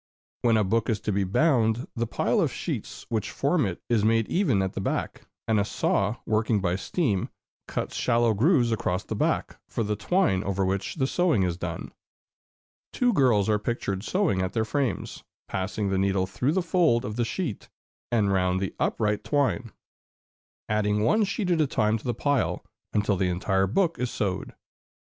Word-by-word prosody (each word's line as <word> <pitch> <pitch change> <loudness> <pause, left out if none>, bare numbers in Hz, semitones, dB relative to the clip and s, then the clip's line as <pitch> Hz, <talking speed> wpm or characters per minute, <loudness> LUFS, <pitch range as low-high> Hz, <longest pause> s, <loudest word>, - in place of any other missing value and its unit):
When 115 -2 +3
a 110 - +3
book 110 +4 0
is 110 -3 +1
to 105 - -1
be 100 0 +1
bound, 115 - +2
the 115 -1 -1
pile - - +1
of - - +1
sheets - - -5
which 110 -2 -1
form 145 - +1
it 90 - -6
is 115 -3 +2
made 115 0 +3
even 135 - +2
at 95 - -3
the - - -3
back, - - -3 0.2
and 110 -2 +3
a - - +3
saw, 105 +1 0
working 110 0 +1
by 90 -2 0
steam, 100 - -1 0.4
cuts - - -4
shallow 115 -1 +2
grooves 120 - +3
across 95 -4 -1
the - - -5
back, - - -1
for 115 - -1
the 105 0 -1
twine 105 - +1
over 95 0 0
which 95 +1 -2
the 135 -5 +1
sewing 160 - +2
is 90 -2 0
done. 85 -2 -5 1.0
Two 245 -1 +2
girls 120 - +3
are 105 -1 +2
pictured 100 -4 -3
sewing 175 - +1
at 95 - -2
their 110 -1 +1
frames, 135 +2 -2 0.2
passing 100 +2 -2
the 95 -1 +1
needle 95 -1 +1
through 125 +9 -1
the 185 0 +1
fold 165 -9 +2
of 105 - -4
the 120 - +1
sheet 120 - -4 0.4
and 105 -4 +2
round 90 -1 +1
the 95 -1 -3
upright 105 -1 0
twine, 140 -5 0 1.0
adding 105 -1 +1
one 215 - +3
sheet 195 -1 -1
at 165 -2 +3
a 150 - +2
time 110 -3 +1
to - - -17
the 120 -2 -1
pile, 145 0 0 0.3
until 100 -2 +1
the 90 0 +1
entire 95 +2 +1
book 170 - +1
is 125 -1 -1
sewed. 95 -4 -3
110 Hz, 185 wpm, -26 LUFS, 100-130 Hz, 1.0 s, When